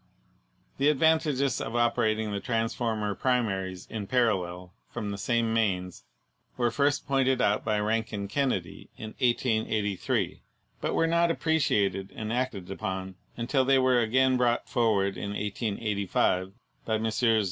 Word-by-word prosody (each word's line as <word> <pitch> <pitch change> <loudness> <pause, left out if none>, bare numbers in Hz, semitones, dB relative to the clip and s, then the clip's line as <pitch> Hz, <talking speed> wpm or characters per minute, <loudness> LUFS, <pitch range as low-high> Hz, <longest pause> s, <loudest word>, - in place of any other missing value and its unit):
The 140 +2 +4
advantages 150 -3 +2
of 115 - -4
operating 110 -2 +1
the 100 - -2
transformer 115 -2 -1
primaries 95 -7 -1
in 105 -3 -5
parallel 90 -7 0 0.2
from 105 -1 -4
the 100 - -4
same 115 0 +1
mains 90 -5 -1 0.5
were 120 -2 +1
first 145 +3 +1
pointed 135 -2 +2
out 105 -3 +2
by 105 -2 0
Rankin 110 -1 -1
Kennedy 100 -7 -2
in 110 0 -7
1883, 110 -5 0 0.4
but - - -1
were 165 - +3
not 170 +1 +3
appreciated 105 -13 +1
and 110 +1 -4
acted 120 -7 -2
upon 95 0 -4 0.2
until 130 +3 +1
they 135 +1 +4
were 130 -1 +4
again 130 +3 +3
brought 120 -1 +1
forward 105 -5 +1
in 100 0 -4
1885 100 -3 -1 0.3
by 110 -1 0
Messrs. 110 +1 +2
110 Hz, 135 wpm, -28 LUFS, 100-130 Hz, 0.5 s, The